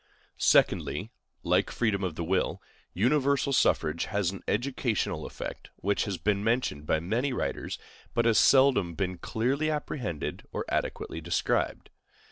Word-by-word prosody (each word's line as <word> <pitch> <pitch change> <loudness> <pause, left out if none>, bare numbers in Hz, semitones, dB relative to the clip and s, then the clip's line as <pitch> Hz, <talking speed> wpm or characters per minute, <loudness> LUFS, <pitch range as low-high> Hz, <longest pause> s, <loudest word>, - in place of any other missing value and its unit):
Secondly, - - +3 0.3
like - - +2
freedom 105 -5 0
of 90 -4 -2
the 85 - -3
will, 90 +3 0 0.3
universal 140 +5 +2
suffrage 80 - +2
has 100 -4 0
an 95 - -8
educational 120 -1 -1
effect, - - -7
which 100 +2 0
has 100 -4 -3
been 100 +4 0
mentioned 110 - 0
by 80 - +2
many 115 - -1
writers, 125 - -3 0.4
but 120 - +2
has 115 -2 +5
seldom 130 -11 +5
been 90 -2 -2
clearly 135 +7 0
apprehended 130 - -3
or - - -3
adequately 80 - -2
described. 85 +2 -1
105 Hz, 135 wpm, -28 LUFS, 90-130 Hz, 0.4 s, has